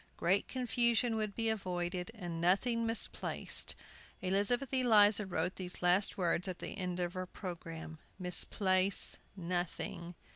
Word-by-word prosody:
Great 190 +4 +2
confusion 240 -2 +1
would 215 -2 -3
be 225 -1 0
avoided 180 -4 -2
and 175 -5 -5
nothing 230 +6 +2
misplaced. 225 0 -2 0.5
Elizabeth 205 +8 +1
Eliza 215 -5 +5
wrote 175 0 -2
these 180 -1 -7
last 180 +4 +3
words 180 0 0
at 185 -2 -4
the - - -6
head 180 -2 -4
of 175 0 -2
her 185 0 -5
programme, 165 -4 -8 0.2
"Misplace 185 +1 +3 0.2
nothing." 175 -1 -3
185 Hz, 125 wpm, -33 LUFS, 175-220 Hz, 0.5 s, Eliza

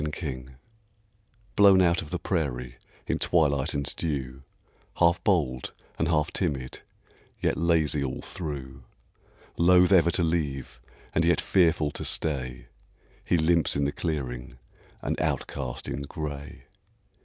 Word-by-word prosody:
COYOTE 65 -5 -6 1.0
Blown 100 -2 +7
out 85 -2 +3
of 80 - -9
the - - -2
prairie 60 -6 -2 0.3
in - - -1
twilight 70 -6 +2
and 70 -1 -2
dew, 65 -5 -3 0.5
Half 85 +1 +3
bold 75 - 0 0.3
and 85 - +1
half 75 -2 +1
timid, 70 -8 -2 0.6
yet - - +1
lazy 80 -4 +2
all 65 - -4
through; 70 -7 -6 0.8
Loath 90 +2 +5
ever 85 -3 +6
to 85 - +1
leave, 70 -7 -2 0.3
and 80 - +2
yet 85 +1 +3
fearful 80 -5 +2
to - - -5
stay, 65 -5 -1 0.6
He 90 - +2
limps 85 0 +2
in 70 - +1
the 70 - 0
clearing, 65 -7 -4 0.5
an - - -1
outcast 70 -4 -2
in 70 - -3
gray. 70 -1 -6
75 Hz, 130 wpm, -27 LUFS, 65-85 Hz, 1.0 s, Blown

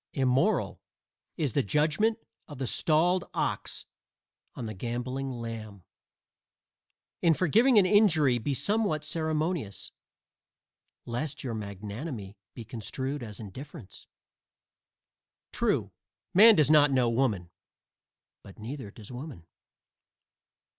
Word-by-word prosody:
"Immoral" 135 +10 +1 0.6
is 145 - -1
the 140 - +3
judgment 155 - +1 0.3
of 145 - -9
the 135 - -2
stalled 170 +7 +2
ox - - -2 0.7
on 125 - -5
the 110 - -5
gamboling 125 +6 -4
lamb. 115 -5 -7 1.4
In 165 -2 +4
forgiving 225 - +4
an 200 - +7
injury 160 - +4
be 135 +5 -2
somewhat 200 - +1
ceremonious, 155 - -2 1.1
lest 145 +5 -4
your 125 -4 -3
magnanimity 105 - -6 0.2
be 115 - -8
construed 130 +4 -4
as 105 -4 -8
indifference. 130 - -10 1.4
True, - - 0 0.4
man 220 +4 +9
does 150 -2 +4
not 150 -1 +6
know 130 -2 +3
woman. 115 -8 0 0.9
But 100 - -14
neither 115 +1 -7
does 105 +2 -11
woman. 125 - -8
135 Hz, 105 wpm, -29 LUFS, 115-155 Hz, 1.4 s, man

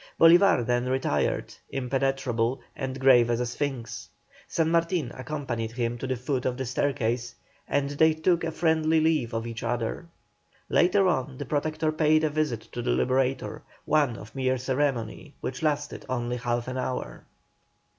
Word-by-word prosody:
Bolívar 165 - +6
then 120 +1 0
retired, 130 +1 0 0.2
impenetrable, 135 -2 0 0.2
and 130 0 -4
grave 125 -3 +6
as 120 0 +1
a 125 - 0
sphinx. 120 -2 -4 0.4
San 165 -1 0
Martin 170 -5 +1
accompanied 130 -4 -4
him 120 -1 -2
to 130 - -4
the 130 - 0
foot 130 +1 -2
of 125 -1 -2
the 130 - -3
staircase, 120 -2 -1 0.3
and 140 0 0
they 160 +2 +4
took 170 +2 +1
a 165 - -1
friendly 160 -1 +2
leave 155 -7 +1
of 115 0 -3
each 115 0 -6
other. 120 +7 -2 0.6
Later 190 +2 +4
on 135 -5 -1
the 145 - -5
Protector 155 +3 0
paid 155 0 +3
a 155 - +1
visit 150 -7 -1
to 120 - -4
the 120 - -2
Liberator, 130 0 0 0.2
one 145 -6 +2
of 105 - -11
mere 130 -1 0
ceremony, 130 +1 -2
which 130 0 -5
lasted 150 -2 -1
only 120 -1 -1
half 120 0 -2
an 130 0 -3
hour. 130 0 -4
130 Hz, 160 wpm, -27 LUFS, 120-155 Hz, 0.6 s, Bolívar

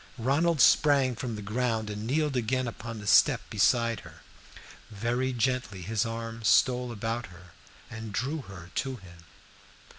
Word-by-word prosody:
Ronald 145 +7 +1
sprang 140 -4 +4
from 120 -1 -4
the 105 - -7
ground 110 +1 -1
and 105 +1 -5
kneeled 150 +1 0
again 125 +1 0
upon 115 0 -7
the 105 - -9
step 125 +4 +5
beside 115 +1 +2
her; - - -14 0.7
very 120 +5 -1
gently 125 -6 -1
his 110 +4 -1
arm 115 0 -6
stole 125 +4 +3
about 115 +2 -3
her 90 0 -15 0.4
and 110 -1 -8
drew 140 +9 -2
her 90 -6 -12
to 135 -1 -2
him. 85 -6 -15
115 Hz, 150 wpm, -28 LUFS, 105-130 Hz, 0.7 s, step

